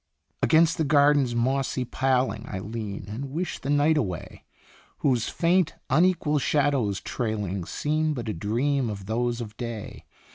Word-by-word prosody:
Against 165 +1 +4
the - - +3
garden's 145 -3 +4
mossy 130 +1 0
paling 130 +1 0
I 100 - -4
lean, 105 0 -5
and 120 +7 -5
wish 170 +6 -3
the 135 - -5
night 145 +2 +3
away, 95 - -4 0.6
Whose 125 -5 +2
faint, 175 -1 +2 0.2
unequal 155 -1 +3
shadows 135 -8 +1
trailing 105 -7 -3
Seem 155 - -1
but 120 -3 -5
a 110 - -1
dream 120 - 0
of 100 -2 -6
those 120 +3 -1
of 110 -2 -7
day. 115 -4 -6
130 Hz, 145 wpm, -26 LUFS, 110-145 Hz, 0.6 s, Against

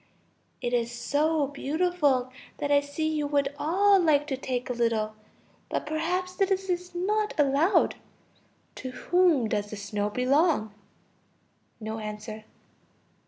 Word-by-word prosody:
It 240 - -2
is 235 -1 +1
so 290 +5 +1
beautiful 285 -2 0 0.3
that 290 - -2
I 285 0 +5
see 285 +2 -3
you 305 -2 -1
would 285 -1 +1
all 390 +6 +4
like 300 -4 +3
to 270 - 0
take 255 -1 -3
a 250 - -2
little. 230 -3 0 0.6
But - - -2
perhaps 350 +4 -1
this 385 0 0
is 360 0 -2
not 420 +4 0
allowed. 295 +7 +3 0.8
To 260 - -5
whom 330 -2 +2
does 205 -1 -2
the 215 - -6
snow 205 +1 -2
belong? 255 - +2 1.1
(No 220 0 -5
answer.) 215 0 -7
285 Hz, 130 wpm, -27 LUFS, 240-350 Hz, 1.1 s, I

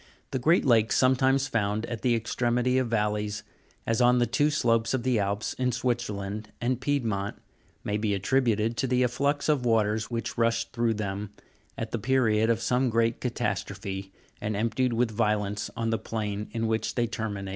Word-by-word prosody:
The 130 - -1
great 160 +8 +3
lakes 115 -4 +4
sometimes 130 +1 +3
found 110 -3 -1
at 120 -2 -5
the 125 -2 +2
extremity 120 +2 +1
of 130 - 0
valleys, 105 -2 -1 0.4
as 115 +2 +1
on 125 0 +5
the 120 - +3
two 145 +4 +2
slopes 115 -4 +1
of 125 - -2
the 125 -3 +2
Alp.;, 100 +1 -1 0.2
in 125 -1 +1
Switzerland 110 -4 -3
and 125 +1 -1
Piedmont, 115 -8 -1 0.5
may 105 0 -1
be 105 -1 0
attributed 115 +1 +1
to 135 - 0
the 125 0 +2
afflux 140 +4 0
of 150 -5 +2
waters 110 -2 +1
which 115 -1 -4
rushed 115 0 +1
through 115 -2 +1
them, 100 -1 -4 0.5
at 115 -1 -4
the 120 - -2
period 110 -2 +2
of 115 -1 +1
some 125 +2 +1
great 115 0 +1
ca 125 - 0
tastrophe, 100 -4 -3 0.3
and 105 0 -2
emptied 115 +4 0
with 115 0 +1
violence 105 -2 0
on 115 0 -1
the 115 - 0
plain 105 -2 -3
in 115 -1 -2
which 110 0 -1
they 120 - +2
terminated. 105 -4 -4
115 Hz, 180 wpm, -27 LUFS, 105-125 Hz, 0.5 s, on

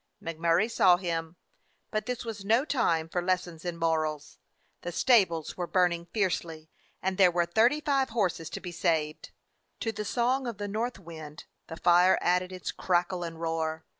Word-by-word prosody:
Mac 165 -1 -6
Murray 170 +5 +3
saw 185 -6 +4
him, 165 -2 -3 0.6
but 215 0 -2
this 250 -1 -3
was 220 -3 -6
no 230 +7 +3
time 170 - +1
for 175 +2 -2
lessons 180 -2 -2
in 175 -2 -4
morals. 155 -2 -1 0.4
The 175 - -5
stables 180 - +2
were 175 -1 -3
burning 175 -2 +1
fiercely, 165 -6 -2 0.3
and 190 +1 -1
there 185 -2 +7
were 175 0 +1
thirty 230 - +3
five 275 -3 +1
horses 185 -8 -1
to - - -6
be 180 - -7
saved. 160 -3 -1 0.5
To 225 - -1
the 210 -1 -5
song 250 +4 0
of 230 -4 -5
the 205 0 -4
north 225 +4 -2
wind 160 -4 -10 0.2
the 165 - -8
fire 180 +2 +5
added 180 +1 +1
its 185 -1 -5
crackle 180 0 0
and 165 -1 -6
roar. 160 -1 -2
175 Hz, 175 wpm, -28 LUFS, 165-210 Hz, 0.6 s, there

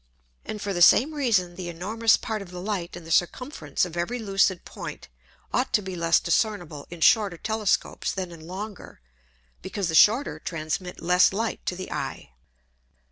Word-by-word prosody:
And 210 - -6
for 200 -1 -3
the 175 - -2
same 265 - +6
Reason, 220 -12 +1
the 180 -2 -5
enormous 215 +7 +2
Part 220 -2 -4
of 195 - -9
the 180 0 -8
Light 185 -3 -3
in 175 - -10
the 165 - -9
Circumference 175 - 0
of 175 -2 -8
every 175 +8 -2
lucid 195 -4 +1
Point - - -8 0.4
ought 255 +1 +1
to 215 - +4
be 190 -1 -5
less 170 -1 +3
discernible 175 -5 -1
in 175 -1 -10
shorter 200 -2 +4
Telescopes 220 +1 -1
than 185 -2 -4
in 160 -1 -11
longer, 200 +2 -8 0.6
because 195 - -3
the - - -2
shorter 225 - +5
transmit 165 +3 -4
less 180 +2 +5
Light 225 +4 -2
to 180 - 0
the 185 +1 -7
Eye. - - -5
185 Hz, 175 wpm, -25 LUFS, 175-215 Hz, 0.6 s, same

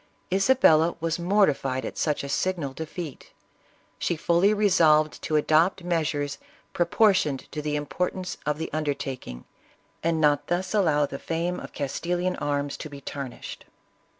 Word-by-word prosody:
Isabella 190 -6 +4
was 165 +1 -1
mortified 160 -9 +1
at - - -5
such 150 -3 -1
a 140 - -5
signal 160 -2 -1
defeat; 160 -1 -7 0.7
she 175 - 0
fully 170 +5 +3
resolved 165 -7 +3
to 155 - -2
adopt 160 +5 +3
measures 150 -5 -1 0.3
proportioned 175 -5 +2
to 150 - -4
the 150 0 -2
importance 180 +5 -3
of 150 0 -1
the 160 - -5
undertaking, 135 - -4 0.6
and 165 0 +1
not 145 -2 +2
thus 180 +3 -1
allow 155 -8 +3
the 140 -1 -7
fame 170 +2 -2
of - - -9
Castilian 175 +5 -2
arms 145 -1 -2
to 155 - -7
be 140 -1 -9
tarnished. 140 -2 -7
155 Hz, 140 wpm, -26 LUFS, 145-180 Hz, 0.7 s, Isabella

